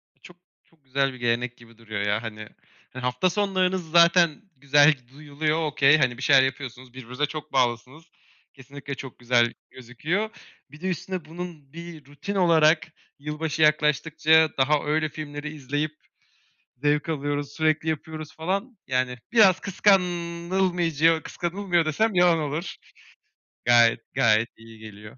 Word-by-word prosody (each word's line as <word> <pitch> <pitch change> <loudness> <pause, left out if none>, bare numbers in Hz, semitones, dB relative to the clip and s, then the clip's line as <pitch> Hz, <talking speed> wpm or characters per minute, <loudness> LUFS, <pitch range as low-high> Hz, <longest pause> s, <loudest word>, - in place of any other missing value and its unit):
İ - - -39
çok, 175 - -15 0.3
çok 155 -4 -33
güzel 135 +1 0
bir 130 - -12
gelenek 120 0 -1
gibi 115 -1 -19
duruyor 110 -3 -6
ya 105 +2 0
hani. 110 -2 -8 0.4
Ha 130 - -8
hafta 125 +9 0
sonlarınız 185 -3 -1
zaten 170 -1 +4
güzel 145 +3 +5
g 130 -4 -11
duyuluyor. 150 +3 -2
Okay, 150 0 +4
hani, 120 -4 0
bir - - -8
şeyler 135 -1 +6
yapıyorsunuz, 130 -2 -5
birbirinize 130 +3 -3
çok 155 +1 -8
bağlısınız. 125 +6 -1 0.5
Kesinlikle 140 +1 -9
çok 135 -1 -10
güzel 120 -1 +2 0.2
gözüküyor. 155 - -3 0.4
Bir 150 - -15
de 190 - -3
üstüne 185 0 -4
bunun 160 -3 -9
bir 170 -4 -10
rutin 145 +8 -7
olarak, 160 -4 +3 0.3
"Yılbaşı 150 +2 -3
yaklaştıkça 155 +1 +3
daha 145 +3 +2
öyle 155 +1 0
filmleri 150 0 -7
izleyip 145 +2 -3 0.8
zevk 150 +4 0
alıyoruz 145 -2 -3
sürekli 155 +1 0
yapıyoruz." 155 0 -5
falan. 195 +8 -3
Yani 125 -1 -1
biraz 195 -6 +5
kıskanılmayacağı 175 -4 +1
kıskanılmıyor 175 -1 -1
desem 215 +8 0
yalan 175 -2 +4
olur. 155 +4 -4 0.9
Gayet, 120 -1 +5
gayet 110 +1 +3
iyi 115 0 -15
geliyor. 105 +1 -12
150 Hz, 140 wpm, -25 LUFS, 130-170 Hz, 0.9 s, şeyler